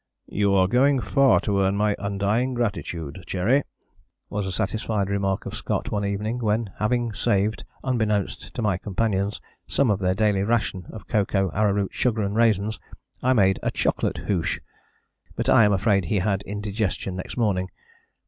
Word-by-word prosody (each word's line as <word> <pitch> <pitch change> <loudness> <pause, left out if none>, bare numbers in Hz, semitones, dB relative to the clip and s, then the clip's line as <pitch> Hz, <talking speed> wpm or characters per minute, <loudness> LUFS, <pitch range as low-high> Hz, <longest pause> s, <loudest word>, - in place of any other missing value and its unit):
"You 100 -1 +2
are 95 -1 +4
going 135 +5 +3
far 125 +4 +4
to 100 -2 0
earn 95 +1 +2
my 105 0 +2
undying 100 +6 0
gratitude, 95 -8 -3
Cherry," 105 +11 +2 0.7
was 100 -1 -2
a - - -3
satisfied 100 0 -1
remark 100 -1 -1
of - - -6
Scott - - -2
one 105 -1 -1
evening 105 +4 -2
when, 110 -2 0
having 115 +2 0
saved, 105 0 0 0.2
unbeknownst 110 -6 -1
to 120 - -2
my 95 -4 +1
companions, 100 0 -1 0.3
some 135 -6 +2
of 100 - 0
their 95 -1 +1
daily 105 -2 +2
ration 100 -4 -1
of 110 - -10
cocoa, 95 -4 +1
arrowroot, 100 0 +1
sugar 115 -4 +1
and 100 +1 -2
raisins, 110 -2 +2 0.4
I 130 +1 +3
made 95 -5 +3
a - - 0
"chocolate - - 0
hoosh." 90 -5 -1 0.8
But - - -2
I 115 - +7
am 105 - +3
afraid 100 -1 +2
he 80 - -1
had 100 0 0
indigestion 100 -2 -2
next 90 - -6
morning. 95 -6 +1
105 Hz, 165 wpm, -24 LUFS, 95-110 Hz, 0.8 s, I